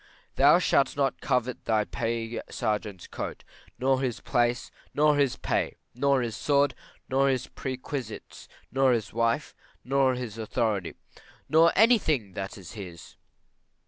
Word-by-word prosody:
Thou 145 +4 +6
shalt 140 -6 +2
not 135 -1 0
covet 125 -2 -1
thy 110 -2 +2
pay 115 +1 -3
sergeants's 105 -4 -3
coat, - - -6 0.3
nor 130 0 +2
his 125 -4 -2
place, 120 -1 0 0.2
nor 150 0 +4
his 140 -4 +2
pay, - - -1 0.2
nor 135 0 +2
his 115 -3 -3
sword, 140 -2 +2 0.3
nor 135 +1 +2
his 130 -2 0
perquisites, 130 -3 -6 0.2
nor 135 -1 +4
his 110 -4 -2
wife, 115 0 0 0.3
nor 135 0 +2
his 115 -3 -6
authority, 110 -5 -1 0.5
nor 165 +2 +5
any 230 +3 +6
thing 120 - -1
that 95 +3 -5
is 95 -4 -10
his. 90 -6 -10
125 Hz, 140 wpm, -27 LUFS, 110-140 Hz, 0.5 s, Thou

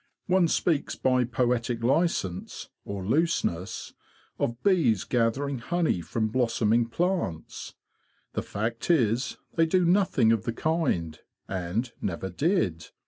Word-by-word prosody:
One 185 -2 +3
speaks 160 -2 0
by 130 -1 +2
poetic 120 -1 0
licence, 125 - 0
or 100 -2 -5
looseness, 110 - -1 0.5
of 120 +1 -2
bees 150 - +3
gathering 125 +3 0
honey 165 - 0
from 110 +5 -1
blos 115 0 0
soming 115 +1 +2
plants. 175 - -2 0.6
The - - -1
fact 115 +6 -4
is 125 -6 +2 0.2
they 165 -1 +3
do 180 +2 +3
nothing 170 - +3
of 115 -3 +1
the 115 - -1
kind, 120 - -1 0.3
and 95 +7 -2
never 95 0 -3
did. 110 - 0
120 Hz, 125 wpm, -27 LUFS, 105-165 Hz, 0.6 s, One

